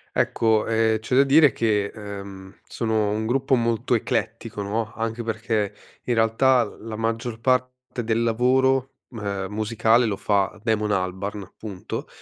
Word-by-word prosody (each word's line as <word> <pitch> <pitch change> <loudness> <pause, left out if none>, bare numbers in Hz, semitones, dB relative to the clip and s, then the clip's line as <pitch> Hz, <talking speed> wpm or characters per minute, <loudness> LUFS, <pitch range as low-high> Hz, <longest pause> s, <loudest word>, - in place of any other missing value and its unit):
Ecco, 110 -2 +2
ehm, 110 -1 +2
c'è 120 +3 -2
da 135 - +7
dire 145 +1 +6
che, 105 -3 +1
ehm, 100 -2 -9
sono 110 -3 0
un 110 +1 -1
gruppo 135 +3 +2
molto 115 -2 +1
eclettico, 110 -2 -2
no, 105 +2 -2
anche 115 +1 -3
perché 110 -2 -1 0.3
in 125 - 0
realtà 120 +3 +3
l - - -10
la 110 -1 -5
maggior 115 +1 -2
parte 125 0 -1
del 115 +1 0
lavoro 130 +3 +2 0.2
m 115 - -8
ehm, 100 -2 -3
musicale 110 +2 +2
lo 105 -3 0
fa 100 +1 0
Damon 110 -2 0
Albarn, 95 +1 -3
punto. 100 -4 -6
110 Hz, 150 wpm, -24 LUFS, 105-120 Hz, 0.3 s, da